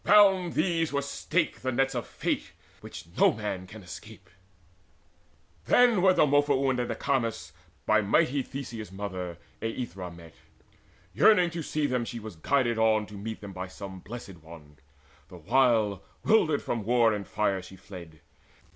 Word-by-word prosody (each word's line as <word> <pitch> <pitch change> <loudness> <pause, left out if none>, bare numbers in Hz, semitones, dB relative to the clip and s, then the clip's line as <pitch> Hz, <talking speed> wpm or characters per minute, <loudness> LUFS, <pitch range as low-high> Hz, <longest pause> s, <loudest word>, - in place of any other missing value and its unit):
Round 195 -4 +5
these 165 -1 +1
were 140 -1 0
staked 155 +4 -1
The 130 - -1
nets 135 +2 +1
of 120 -2 -3
Fate, - - -3 0.3
which - - -10
no - - +6
man 105 -4 -4
can 100 +2 -11
escape. 95 0 -11 1.3
Then 240 -6 +5
were 185 0 +5
Demophoon 140 -3 +3
and 120 - -2
Acamas 130 -5 -1 0.3
By 110 0 +4
mighty 125 +7 +2
Theseus' 120 -6 -7
mother 95 -3 -5 0.2
Aethra 115 -5 -4
met. 85 -2 -13 0.8
Yearning 180 - +5
to 170 0 -4
see 155 0 -1
them 125 -3 0
was 115 - -4
she 120 -2 -6 0.2
guided 120 - +1
on 110 -1 +3
To 105 - -14
meet 110 +2 -6
them 100 -2 -8
by 95 0 -5
some 95 0 -9
Blessed 100 -2 -9
One, 80 -3 -14 0.5
the 90 - -12
while 110 0 +2 0.2
'Wildered 160 -10 +3
from 115 -3 -2
war 115 0 +3
and 100 -2 -4
fire 100 -3 0
she 90 +1 -12
fled. 85 -5 -12
115 Hz, 155 wpm, -28 LUFS, 95-140 Hz, 1.3 s, no